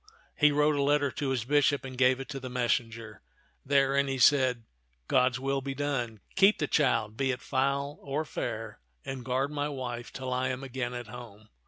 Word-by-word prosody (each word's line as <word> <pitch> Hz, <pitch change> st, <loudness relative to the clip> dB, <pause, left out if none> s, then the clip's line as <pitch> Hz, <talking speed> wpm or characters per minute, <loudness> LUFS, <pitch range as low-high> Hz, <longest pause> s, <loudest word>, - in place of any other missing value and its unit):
He 150 Hz, -1 st, +5 dB
wrote 150 Hz, +1 st, +3 dB
a 140 Hz, -, 0 dB
letter 145 Hz, 0 st, +2 dB
to 145 Hz, -3 st, -3 dB
his 125 Hz, -4 st, -1 dB
bishop 145 Hz, 0 st, +2 dB
and 130 Hz, -1 st, -7 dB
gave 130 Hz, 0 st, +3 dB
it 135 Hz, -, -6 dB
to 140 Hz, -2 st, -5 dB
the 130 Hz, -1 st, -7 dB
messenger. 115 Hz, -3 st, -2 dB, 0.4 s
Therein 140 Hz, 0 st, +2 dB
he 135 Hz, -1 st, -2 dB
said, 130 Hz, -2 st, +4 dB, 0.2 s
" -, -, -43 dB
God's 130 Hz, 0 st, +2 dB
will 135 Hz, +1 st, -1 dB
be 135 Hz, 0 st, -5 dB
done. 130 Hz, -6 st, -2 dB
Keep 195 Hz, +2 st, +5 dB
the -, -, 0 dB
child, 110 Hz, -7 st, +1 dB
be 135 Hz, +3 st, 0 dB
it 125 Hz, -1 st, -1 dB
foul 140 Hz, +3 st, -1 dB
or 145 Hz, +3 st, -2 dB
fair, 110 Hz, -5 st, -5 dB, 0.3 s
and 135 Hz, -2 st, -5 dB
guard 130 Hz, +3 st, -1 dB
my 145 Hz, 0 st, -2 dB
wife 120 Hz, -4 st, -5 dB
till 130 Hz, -1 st, -4 dB
I 130 Hz, +1 st, 0 dB
am 130 Hz, +1 st, -3 dB
again 125 Hz, -2 st, -4 dB
at 120 Hz, 0 st, -5 dB
home. 110 Hz, -2 st, -11 dB
130 Hz, 200 wpm, -29 LUFS, 120-140 Hz, 0.4 s, He